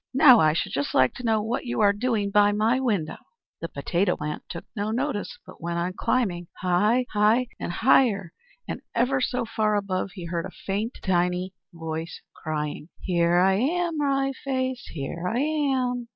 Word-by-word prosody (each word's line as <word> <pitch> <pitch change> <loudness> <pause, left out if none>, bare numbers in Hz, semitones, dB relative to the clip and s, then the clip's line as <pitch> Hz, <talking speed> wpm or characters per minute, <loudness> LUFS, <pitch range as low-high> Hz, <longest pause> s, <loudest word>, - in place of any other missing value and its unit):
Now 260 -3 +8
I 155 -1 +4
should 165 - -2
just 140 +1 -2
like 130 -1 +4
to 250 - -9
know 220 -2 +1
what 235 +3 -3
you 240 - -2
are 200 -1 +5
doing 210 -2 -1
by 205 0 +5
my 220 +5 +2
window?" 205 -12 -1 0.4
The 165 - -3
potato 175 +6 0
plant 150 0 -4
took 170 - -7
no 205 0 -2
notice, 240 -1 -2
but 185 - -14
went 170 +1 -3
on 175 +2 -1
climbing 185 -6 -1
high, 210 +8 +2
high, 220 +4 +3
and - - -3
higher; 205 -4 +3 0.3
and - - -5
ever 255 +3 +2
so 250 -1 -1
far 215 -1 0
above 195 -2 -2
he 180 - -7
heard 170 +1 -3
a 200 +4 -3 0.2
tiny 180 0 +1
faint - - -42 0.2
voice 165 -1 -5
crying: 150 0 -4
"Here 170 -1 +2
I 190 +2 +4
am, 330 - 0
Wry 275 -1 +1
Face, 260 -2 -2
here 165 +4 -5
I 225 - -1
am!" 265 -4 0
205 Hz, 180 wpm, -25 LUFS, 175-250 Hz, 0.4 s, Now